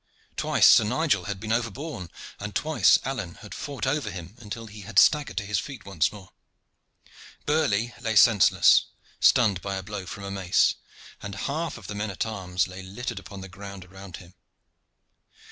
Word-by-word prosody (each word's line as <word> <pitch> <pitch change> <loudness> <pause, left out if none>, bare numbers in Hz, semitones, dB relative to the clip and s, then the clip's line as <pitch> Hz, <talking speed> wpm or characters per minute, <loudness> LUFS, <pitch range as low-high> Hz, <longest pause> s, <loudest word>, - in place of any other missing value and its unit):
Twice - - +2
Sir - - +8
Nigel 140 +9 0
had 100 -2 -4
been 110 +2 -5
overborne, 115 - -3 0.3
and 105 0 -6
twice 155 0 +4
Alleyne 115 -11 -4
had 105 - -11
fought 140 -2 -5
over 135 -3 -1
him 90 -1 -8
until 115 0 -7
he 105 -1 -11
had 100 - -8
staggered 150 - +4
to 100 - -1
his 105 +1 0
feet 140 -3 -8
once 85 -6 0
more. 100 -3 -13 1.1
Burley 120 -7 +1
lay 110 -1 -1
senseless, 105 -3 +6 0.3
stunned 100 -6 +4
by 100 -1 -3
a 95 - -4
blow 100 -2 -6
from 100 - -8
a 100 - -5
mace, 95 -2 +2 0.5
and 100 -1 -6
half 155 +1 -3
of 110 - -13
the 105 - -6
men 105 +1 -3
at 95 - -2
arms 95 -5 -2
lay 95 +1 -9
littered 100 +7 -6
upon 100 -2 -10
the 95 - -8
ground 100 0 -10
around 95 0 -11
him. 90 -1 -15
105 Hz, 180 wpm, -26 LUFS, 95-120 Hz, 1.1 s, Sir